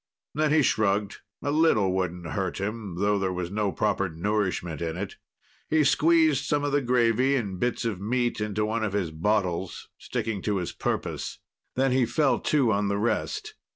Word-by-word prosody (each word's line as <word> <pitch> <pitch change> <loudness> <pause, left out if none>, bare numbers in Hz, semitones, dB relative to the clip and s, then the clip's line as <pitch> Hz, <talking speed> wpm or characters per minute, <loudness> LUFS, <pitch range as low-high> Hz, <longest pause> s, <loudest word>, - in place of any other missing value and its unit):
Then 155 0 +1
he 150 -1 +4
shrugged. 105 -3 +1 0.3
A 145 - 0
little 145 - +3
wouldn't 90 -2 -2
hurt - - -2
him, 105 -2 -4
though 100 +2 +1
there 95 -1 0
was 90 -1 -4
no 105 -1 0
proper 100 -2 0
nourishment 90 -2 -2
in 80 0 -3
it. 100 +1 -5 0.5
He 155 -1 +4
squeezed 155 -1 +4
some 145 -1 0
of 145 - 0
the 145 0 +2
gravy 125 +1 +2
and 100 -8 -2
bits 120 +1 -1
of 105 -5 -2
meat 120 +1 0
into 105 0 -1
one 110 +1 -1
of 105 -3 -1
his 95 -6 -1
bottles, 90 +1 -1
sticking 105 -4 -3
to 105 0 0
his 90 -2 -3
purpose; - - -3 0.4
then 135 0 +2
he 125 -2 +3
fell 135 +4 +2
to 135 -7 +2
on 100 0 +1
the 100 0 0
rest. 425 - -1
105 Hz, 185 wpm, -26 LUFS, 95-130 Hz, 0.5 s, he